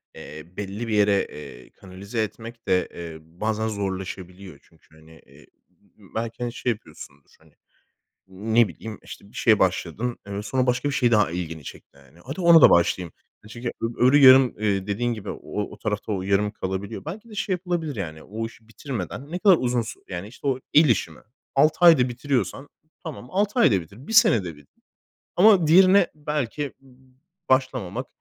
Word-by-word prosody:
eee, 75 0 -10
belli 105 +3 -5
bir 110 - -2
yere, 100 -1 +3
eee, 70 -4 -11
kanalize 100 +4 -5
etmek 115 +2 -9
de, 90 - +2
eee, 85 -2 -8
bazen 105 +7 -3
zorlaşabiliyor. 95 -4 -6
Çünkü, 80 -1 -26
hani, 80 +1 -19
eee, - - -19 0.2
b - - -28
b - - -20
belki, 115 +2 -4
hani, 120 - -3
şey 125 - -1
yapıyorsundur, 75 -9 -11
hani, - - -25 0.7
ne 110 +4 +1
bileyim, 105 +5 -9
işte, - - -12
bir - - -20
şeye - - +4
başladın, 120 +2 -1
eee, 100 0 -4
sonra 130 +4 -1
başka 125 +3 0
bir 140 - -3
şey 120 -3 +2
daha 105 -7 +3
ilgini 80 -3 -5
çekti, 70 - -12
hani. 70 +4 -21
Hadi 140 +8 -6
ona 170 -2 +7
da - - +9
başlayayım. 85 0 +2 0.3
E, - - -12
çünkü 120 +3 -7
ö - - 0
öbürü 130 +4 +5
yarım, 130 -2 +7
eee, 100 -2 -1
dediğin 120 +4 -1
gibi 105 -3 -7
o - - -4
o 105 -1 -4
o - - -11
tarafta 105 0 -3
o 95 - -2
yarım 100 +2 +1
kalabiliyor. 95 +3 -5
Belki 210 +8 -8
de 215 - -11
şey 195 - -1
yapılabilir, 175 -5 -3
yani 80 -6 -6
o 110 +3 -5
işi 115 0 -12
bitirmeden 130 +3 -7
ne 180 - -3
kadar 190 -2 +6
uzun 125 -1 0
su 110 - -9
yani, 90 +1 -5
işte, 125 +5 -8
o 130 -2 0
el 155 -1 +6
işi 95 -7 +1
mi, 75 - -16 0.3
6 155 +5 +3
ayda 140 -7 +6
bitiriyorsan 130 -1 -2 0.3
tamam, 150 -6 -8
6 205 +5 0
ayda 100 - +4
bitir, 100 - -15
1 - - -5
senede 115 - +4
bitir 75 -1 -23 0.5
ama 185 -4 +5
diğerine 185 +3 +6
belki 150 -2 -3
b - - -25
b 130 0 -27 0.3
başlamamak, 130 -8 0
115 Hz, 190 wpm, -24 LUFS, 95-135 Hz, 0.7 s, da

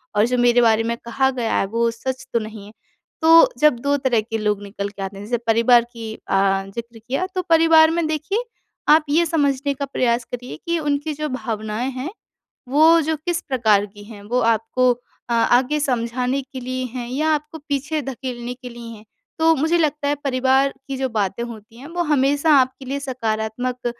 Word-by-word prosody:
और 210 +1 +4
जो 250 0 0
मेरे 245 0 +4
बारे 225 -1 +4
में 235 0 -2
कहा 265 +3 +1
गया 240 -3 -2
है, - - +1
वो 230 +3 0
सच 260 +3 -5
तो 235 - +3
नहीं 215 -2 -8
है?" 210 - -13 0.5
तो 330 +9 +7
जब 300 -5 +4
2 285 +3 +1
तरह 255 -5 +1
के 225 +1 -4
लोग 210 -1 -1
निकल 200 0 -5
के 200 -1 -10
आते 195 +1 -6
हैं, 200 - -8
जैसे 240 +2 -1
परिवार 235 +1 +5
की 225 -2 -7
अ, 195 -1 +1
ज़िक्र 235 -1 -7
किया, 265 +11 -2
तो 370 - +1
परिवार 325 -1 +6
में 335 0 0
देखिए, 315 - -2 0.5
आप 310 +1 +6
ये 330 +4 +3
समझने 285 -3 0
का 280 +1 -4
प्रयास 240 -3 0
करिए 245 -7 -6
कि 340 0 +1
उनकी 295 0 -1
जो 305 +1 -3
भावनाएँ 220 -1 -3
हैं, 260 +5 -5 0.6
वो 315 +4 +5
जो 315 0 -1
किस 340 +3 -2
प्रकार 220 -6 +3
की 205 0 -14
हैं। 205 -1 -12
वो 245 +5 -1
आपको 245 +3 +1 0.4
अ, 235 - -2
आगे 250 +5 +3
समझाने 250 0 -1
के 265 0 -9
लिए 255 +1 -4
हैं 240 -1 -5
या 305 +5 0
आपको 300 +2 -5
पीछे 290 +2 -1
धकेलने 250 -2 -5
के 250 0 -10
लिए 235 -1 -10
हैं? 210 - -16 0.3
तो 325 0 +4
मुझे 320 +5 +1
लगता 300 -3 0
है, 290 - +2
परिवार 265 +1 +2 0.2
की 270 - -3
जो 265 0 -1
बातें 205 0 -1
होती 225 -1 -11
हैं, 275 - -10
वो 345 +1 -2
हमेशा 290 0 +2
आपके 260 +1 -2
लिए 275 +2 -2
सकारात्मक 245 -1 -3
255 Hz, 200 wpm, -21 LUFS, 230-290 Hz, 0.6 s, तो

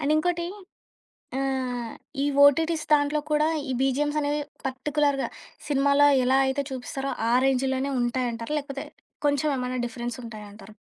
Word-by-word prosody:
And 295 0 +1
ఇంకోటి, 345 +2 0 0.9
ఆహ్, 255 -3 -2 0.3
ఈ - - +2 0.2
ఓటీటీస్ 320 +2 +3
దాంట్లో 295 +1 +3
కూడా. 300 +1 +3 0.2
ఈ - - 0
బీజీఎమ్స్ 290 +3 +1
అనేవి 290 +1 0 0.2
పర్టిక్యులర్‌గా 280 +1 0 0.4
సినిమాలో 280 0 +4 0.2
ఎలా 260 +2 +4
అయితే 270 +2 0
చూపిస్తారో, 270 +1 -4 0.2
ఆ - - +3
రేంజ్‌‌లోనే 265 +1 +1
ఉంటాయంటారా? 240 +1 -2
లేకపోతే 275 -1 -6 0.4
కొంచెం 285 +1 +2
ఏమన్నా 250 0 -2
డిఫరెన్స్ 240 0 -5
ఉంటాయంటార? 215 -1 -10
270 Hz, 125 wpm, -26 LUFS, 250-290 Hz, 0.9 s, సినిమాలో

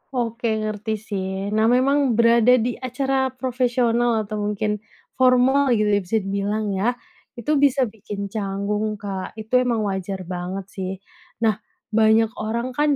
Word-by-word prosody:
Oke 235 -1 -1 0.2
ngerti 215 0 -2
sih. 195 -2 -4
Nah, 215 +1 +3
memang 260 +1 +3
berada 235 +1 +5
di 245 0 -1
acara 265 +1 0
profesional 240 -3 +1
atau 210 0 -5
mungkin 210 0 -1 0.4
formal 260 +2 +4
gitu 210 -1 +1
ya, 205 - +3
bisa 195 +3 -1
dibilang 200 +2 -1
ya, 205 +6 0 0.4
itu 240 +4 -3
bisa 275 -1 +4
bikin 205 -3 -6
canggung, 210 +1 -2
Kak. 200 -2 -6
Itu 220 +3 +1
emang 240 -3 0
wajar 190 -1 -3
banget 180 +2 -5
sih. 185 -1 -4 0.5
Nah, 215 -2 +2 0.3
banyak 220 0 +4
orang 235 +4 -2
kan 295 +3 +2
220 Hz, 145 wpm, -22 LUFS, 200-245 Hz, 0.5 s, berada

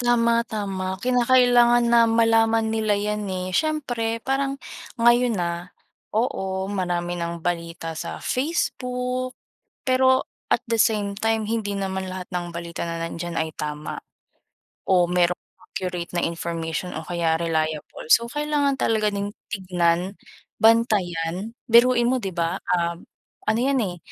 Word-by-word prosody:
Tama-tama. 230 -6 +1
Kinakailangan 245 -1 +5
na 235 -1 +6
malaman 225 -1 +3
nila 220 -1 +1
'yan, 210 0 -2
eh. 185 -1 -3
Siyempre, 235 - -1
parang, 275 +1 0 0.4
ngayon, 240 0 +4
ah, 170 +2 -4 0.4
oo, 190 -4 -1
marami 175 -2 -2
ng 170 -1 -4
balita 165 -2 -3
sa - - -6
Facebook, 255 -3 -2 0.5
pero, 260 0 +4 0.2
at - - +1
the 230 -2 +3
same 205 -2 0
time 220 +1 0
hindi 210 -2 -2
naman 190 -1 -3
lahat 185 0 -6
ng 175 -1 -2
balita 170 0 -6
na 170 0 -3
nandiyan 170 0 -4
ay 160 -1 -2
tama, 150 0 -5 0.8
o 180 -2 +3
merong 180 0 +2 0.2
accurate 180 -2 -5
na 175 -1 0
information 170 +1 -3
o 160 0 -6
kaya 165 -2 0
reliable. 160 -1 -2
So, 235 - +6
kailangan 295 +1 0
talaga 215 -2 +1
ding 200 0 -2 0.2
tignan, 180 -1 0 0.4
bantayan, 205 -3 +2 0.2
biruin 240 +1 +5
mo, 260 - +2
'di 195 -6 -5
ba, 170 -1 -1 0.2
um, 170 0 -2 0.4
ano 220 +1 +2
'yan, 275 +1 +2
eh, 190 -7 -1
200 Hz, 130 wpm, -24 LUFS, 175-235 Hz, 0.8 s, na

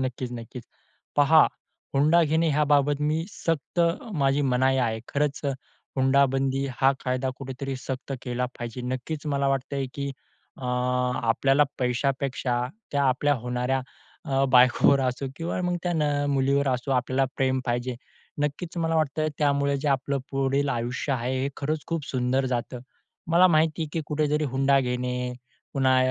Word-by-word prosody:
नक्कीच, 130 -1 -3
नक्कीच, 120 0 -8 0.5
पहा 150 +2 +6 0.5
हुंडा 155 +5 +5
घेणे 160 +2 +2
याबाबत 145 -1 +2
मी 155 +2 0
सक्त 165 -2 -2 0.3
माझी 140 -2 +2
मनाई 130 0 +2
आहे. 115 -3 0
खरंच 145 0 -1 0.6
हुंडाबंदी 135 0 +2
हा 135 +1 +4
कायदा 130 0 0
कुठेतरी 135 0 -5
सक्त 130 +1 -5
केला 125 0 -2
पाहिजे. 120 +1 -5
नक्कीच 145 +4 -5
मला 140 -1 +1
वाटतंय 135 0 -1
की, 140 0 -3 0.5
अ, 130 - -9
आपल्याला 125 +2 +2
पैशापेक्षा 130 0 0 0.3
त्या 140 -1 +2
आपल्या 145 +2 +2
होणाऱ्या 125 +2 0 0.5
अ, 135 0 +2
बायकोवर 130 +2 +5
असो 130 +1 -1
किंवा 170 +2 -3
मग 180 0 0
त्या 175 - 0
न 155 - +1 0.3
मुलीवर 140 0 +2
असो 125 +1 -1
आपल्याला 130 +1 +1
प्रेम 130 -1 +1
पाहिजे. 120 +1 -1 0.5
नक्कीच 150 +4 -3
मला 165 -1 +1
वाटतं 155 0 0
त्यामुळे 140 -1 +2
जे 150 - -1
आपलं 140 0 0
पुढील 135 +1 +1
आयुष्य 120 +3 -2
आहे 125 0 -1
हे 140 - 0
खरंच 150 +2 -2
खूप 165 -3 -2
सुंदर 130 +1 0
जातं. 125 0 -3 0.5
मला 175 +3 +6
माहिती 160 0 +2
आहे, 155 - -4
की 165 - -1
कुठेतरी 150 0 0
हुंडा 135 +1 +3
घेणे 125 0 -2 0.4
पुन्हा 130 -1 +3
135 Hz, 145 wpm, -26 LUFS, 125-145 Hz, 0.6 s, पहा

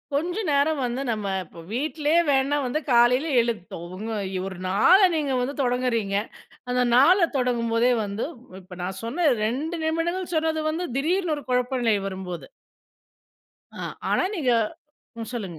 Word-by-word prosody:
கொஞ்ச 345 +7 -1
நேரம் 285 0 +2
வந்து 245 +2 -2
நம்ம 215 -3 -3 0.2
இப்ப, 165 - -13
வீட்லயே 305 +4 +1
வேன்ணா 275 +1 +2
வந்து 250 +5 -1
காலைல 245 +5 +4
எழுந்ட்டோம் 210 -7 -4
உங்க 220 +4 -5 0.4
ஒரு 190 -2 -7
நாள 280 - +6 0.2
நீங்க 290 -4 0
வந்து 275 +3 -3
தொடங்குறீங்க! 240 -5 0 0.5
அந்த 250 0 +2
நாள 315 +10 +6 0.2
தொடங்கும்போதே 240 -1 +1
வந்து 200 +2 -3 0.4
இப்ப 180 0 -12
நான் 185 +1 -4
சொன்ன 305 +8 0 0.2
2 290 +9 -2
நிமிடங்கள் 340 +3 -1
சொன்னது 315 0 0
வந்து, 335 +3 -2
திடீர்னு 335 +2 +1
ஒரு 290 - -8
குழப்ப 250 +1 +1
நிலை 225 -3 +3
வரும்போது. 185 -2 -6 1.3
ஆ, - - -8 0.3
ஆனா - - +2
நீங்க 280 -8 +1 0.7
ம். 225 - -5
சொல்லுங்க. 195 -9 -5
250 Hz, 140 wpm, -24 LUFS, 225-310 Hz, 1.3 s, நாள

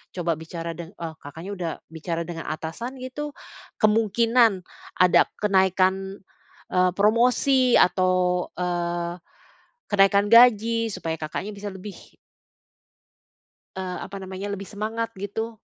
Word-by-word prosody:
coba 175 -2 0
bicara 165 +1 -6
deng 170 -1 -7
eee, 165 -1 -6
Kakaknya 165 +7 -8
udah 170 -2 -2 0.2
bicara 165 +1 -4
dengan 165 -1 -7
atasan 165 +12 -5
gitu? 290 +3 -5 0.5
Kemungkinan 225 -1 +3 0.4
ada 180 -1 +5 0.2
kenaikan, 190 -1 +2 0.5
eee, 180 0 +3
promosi 245 +4 +4
atau, 180 0 +2
eee, 175 -1 -2 0.7
kenaikan 200 0 +4
gaji 230 -1 +5
supaya 165 -1 -3
Kakaknya 160 +6 -4
bisa 205 +1 -8
lebih 190 +1 -9 1.8
eee, 185 -1 -4
apa 195 +1 -8
namanya 190 +2 -6
lebih 200 0 -6
semangat 220 +3 -4
gitu? 220 +3 -5
190 Hz, 110 wpm, -24 LUFS, 175-220 Hz, 1.8 s, ada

